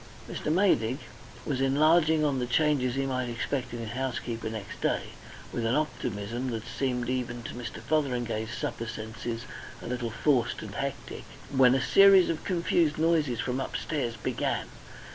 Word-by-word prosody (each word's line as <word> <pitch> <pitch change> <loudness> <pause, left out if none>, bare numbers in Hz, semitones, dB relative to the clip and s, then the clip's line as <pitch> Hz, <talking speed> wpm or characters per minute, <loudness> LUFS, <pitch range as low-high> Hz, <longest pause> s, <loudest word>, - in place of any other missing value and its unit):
Mr. 150 - -3
Maydig 135 - +3 0.5
was 135 -3 -1
enlarging 155 +3 +4
on 140 -3 +1
the 125 - -1
changes 135 -2 +2
he 135 0 0
might 130 -2 -1
expect 120 +2 -2
in 120 - -5
his 115 -2 -5
housekeeper 120 -3 -3
next 110 -3 -7
day, - - 0 0.4
with 120 - -2
an 115 +2 +2
optimism, 120 -5 -2
that 115 -3 -3
seemed 125 -3 -2
even 120 -1 -2
to - - -6
Mr. 120 -1 -6
Fotheringay's 120 -4 -1
supper 115 - -3
senses 115 +1 -5 0.3
a - - -10
little 120 -1 -2
forced 120 0 +1
and 105 -2 -7
hectic, 140 +4 -4 0.3
when 130 -1 +6
a 135 - +2
series 195 +3 +7
of 160 - -4
confused 170 -4 +1
noises 155 -7 +2
from 125 +1 -1
upstairs 135 -3 -2
began. 110 - -2
125 Hz, 160 wpm, -28 LUFS, 115-150 Hz, 0.5 s, series